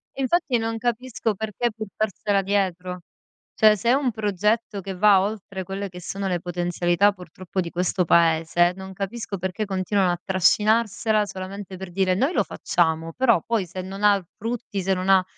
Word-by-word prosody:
Infatti 270 -1 +1
non 225 0 -2
capisco 235 -2 -2
perché 220 +3 -2
portarsela 210 -1 -1
dietro. 185 -2 -1 0.6
Cioè, 215 -1 +5
se 235 +4 -1
è - - +5
un 270 -2 +1
progetto 210 0 -1
che 190 0 -6
va 195 0 +5
oltre 200 -2 -4
quelle 195 +2 -4
che 180 0 -10
sono 195 +3 -4
le 180 -2 0
potenzialità 175 +2 +1
purtroppo 185 +1 -5
di 170 - -4
questo 180 +1 0
paese, 170 +1 +3
non 190 0 -9
capisco 200 +1 -4
perché 190 +4 -3
continuano 190 -1 +1
a 175 - -3
trascinarsela 210 +3 +2
solamente 195 0 -7
per 190 -1 -8
dire: 185 0 +1
"Noi 270 - +1
lo - - +2
facciamo," 165 -1 -1
però 235 -9 +3
poi 225 -5 0
se 185 +2 -6
non 195 +2 -7
ha 205 -1 +6
l 185 - -10
frutti, 225 -3 -4
se 190 +1 +1
non 185 +1 -2
ha 190 -1 +6
195 Hz, 175 wpm, -24 LUFS, 180-215 Hz, 0.6 s, ha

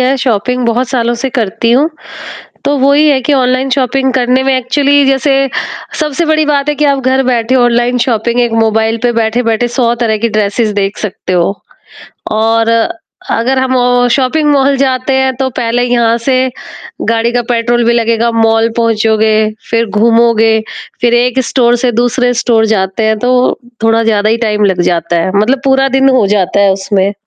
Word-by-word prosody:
है 255 +2 +1
शॉपिंग 250 0 -1
बहुत 240 +2 0
सालों 240 -2 -1
से 270 - 0
करती 230 -2 -1
हूँ। 270 +6 +3 0.8
तो 290 - +1
वो 275 +2 +3
ही 300 +2 +3
है 275 -2 +2
कि 290 - 0
ऑनलाइन 255 0 0
शॉपिंग 265 0 0
करने 255 0 +1
में 270 0 +1
एक्चुअली 280 +3 +1
जैसे 270 +1 +1 0.7
सबसे 305 +1 -1
बड़ी 310 0 +1
बात 290 -1 0
है 295 - -1
कि 300 - 0
आप 280 -1 +1
घर 265 +1 0
बैठे 245 0 0
ऑनलाइन 240 0 +1
शॉपिंग 235 0 -1
एक 240 -1 0
मोबाइल 225 0 0
पे 245 - +2
बैठे-बैठे 230 +1 0
100 235 -3 +1
तरह 220 -2 0
की - - 0
ड्रेसेज़ 215 +1 -1
देख 200 0 -2
सकते 190 -3 -5
हो। 175 +1 +1 0.8
और 225 +1 +1 0.6
अगर 255 +4 0
हम 260 0 0 0.4
शॉपिंग 295 +4 +1
मॉल 275 0 +2
जाते 260 -1 -1
हैं 265 0 0
तो 265 +1 -1
पहले 240 0 0
यहाँ 235 -2 +1
से 255 -1 +2 0.7
गाड़ी 230 +1 0
का 245 0 0
पेट्रोल 240 0 0
भी 235 - +2
लगेगा 230 0 0
मॉल 225 0 +2
पहुँचोगे, 220 -1 +1 0.2
फ़िर 230 0 +1
घूमोगे, 225 -1 +3 0.4
फ़िर 240 -1 +2
1 245 +2 +1
स्टोर 240 -2 +2
से 245 - +2
दूसरे 245 +2 0
स्टोर 225 -2 +2
जाते 190 +2 -2
हैं। 220 0 0
तो 250 +2 +1 0.2
थोड़ा 225 0 +2
ज़्यादा 215 -2 +1
ही 225 - +2
टाइम 210 0 0
लग 190 -3 0
जाता 170 0 -1
है, 175 - -1
मतलब 245 +6 +1
पूरा 270 0 +2
दिन 270 0 +3
हो 255 -6 +2
जाता 190 +1 0
है 200 -1 +3
उसमें। 195 0 -1
240 Hz, 180 wpm, -11 LUFS, 225-260 Hz, 0.8 s, हूँ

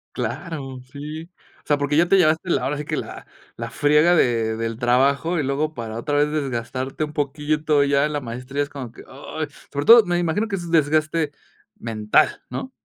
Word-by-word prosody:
Claro, 135 -7 -5
sí, 155 +4 -8 0.3
o - - -53
sea, 145 - +2
porque 145 +1 -1
ya 170 +2 +5
te 195 - +5
llevaste 165 +1 +2
la - - +1
ahora 145 - -1
sí 150 - -4
que 155 0 -3
la - - -7 0.3
la - - -5
friega 150 +4 +4
de 115 -8 +2
del 115 0 -3
trabajo 140 +7 +2
y - - 0
luego 145 +3 -1
para 115 -3 -6
otra 145 +4 -1
vez 150 +1 +3
desgastarte 135 0 -3
un 150 - -11
poquito 150 +1 0
ya 140 +1 +2
la 150 - -2
maestría 125 +3 -4
es 145 - -6
como 130 -5 -7
que: - - -13
"Ay". 155 +3 -6 0.2
sobre 140 0 -3
todo, 230 -1 +9
me 175 0 0
imagino 175 +6 0
que 195 - -1
es 175 -2 -6
desgaste 155 -1 +2 0.5
mental, 110 -2 +1
¿no? - - -5
145 Hz, 195 wpm, -22 LUFS, 130-155 Hz, 0.5 s, todo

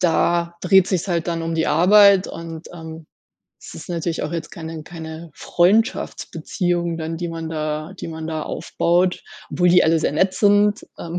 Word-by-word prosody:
Da 170 0 +1
dreht 190 -2 +4
sich's 185 0 -2
halt 170 -2 -1
dann 165 -1 -2
um 165 0 -3
die 160 0 0
Arbeit 195 +4 +5
und, 165 0 -8
ähm, 160 -2 -10 0.5
es - - -12
ist - - -11
natürlich 170 -1 -3
auch - - -4
jetzt 165 -1 -5
keine 160 -2 -7
keine 160 0 -9
Freundschaftsbeziehung 175 -3 0
dann, 165 0 -4
die 175 +1 -4
man 165 -1 -6
da 155 +1 -3
die - - -6
man 160 -1 -6
da 155 -1 -3
aufbaut, 180 +1 0 0.3
obwohl 180 - +2
die 180 +1 +5
alle 165 +1 +3
sehr 150 - 0
nett 185 +5 +1
sind, 205 +1 +3
ähm, 170 +1 -5
170 Hz, 175 wpm, -21 LUFS, 160-180 Hz, 0.5 s, Arbeit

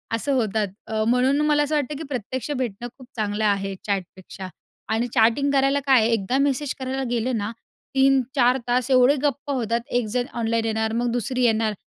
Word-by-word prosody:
असं 280 +5 -2
होतात. 220 -4 0 0.2
अ, 220 -1 -1
म्हणून 250 +3 +3
ना 300 - +1
मला 295 -1 +3
असं 300 +1 -1
वाटतं 295 0 -1
की 320 - -6
प्रत्यक्ष 260 +2 -4
भेटणं 240 -2 -3
खूप 255 - -13
चांगलं 215 -1 -2
आहे 195 -1 0
चॅटपेक्षा 190 -1 -5 0.5
आणि 235 +2 0
चॅटिंग 235 +6 +3
करायला 275 0 +2
काय 260 -3 +6
आहे, 220 - +2
एकदा 225 +4 0
मेसेज 280 0 0
करायला 265 +1 -3
गेलं 240 0 -1
ना 205 +1 -3 0.4
3-4 265 -1 +3
तास 245 +1 +1
एवढे 255 +2 +5
गप्पा 285 0 -1
होतात, 235 -2 0
एकजण 245 0 -1
ऑनलाईन 230 -1 -1
येणार, 220 0 -1
मग 240 0 0
दुसरी 250 +1 -1
येणार 220 -1 +2
245 Hz, 180 wpm, -23 LUFS, 220-265 Hz, 0.5 s, काय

